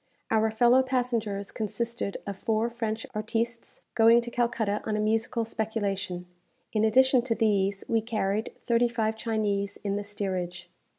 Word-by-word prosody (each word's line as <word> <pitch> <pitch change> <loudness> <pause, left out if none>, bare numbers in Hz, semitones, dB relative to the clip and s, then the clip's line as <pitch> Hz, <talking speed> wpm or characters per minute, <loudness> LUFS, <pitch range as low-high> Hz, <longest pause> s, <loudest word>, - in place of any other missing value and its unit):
Our 220 0 +3
fellow 240 +3 +5
passengers 235 -6 -1
consisted 230 -1 -3
of 200 - -4
four 225 +4 0
French 225 -1 -3
artistes, 230 +2 -3
going 230 +1 +6
to 240 0 -7
Calcutta 235 -4 0
on 215 -1 -1
a - - -1
musical 225 +2 0
speculation. 200 -5 -2 0.5
In 215 -1 +2
addition 255 +3 +5
to 235 -2 -1
these, 200 -3 +1
we 225 -1 +2
carried 215 -1 -1
thirty 235 0 +3
five 225 -2 -1
Chinese 210 -3 -1
in 200 -1 -1
the 205 - -3
steerage. 180 -4 -4
220 Hz, 150 wpm, -28 LUFS, 205-235 Hz, 0.5 s, going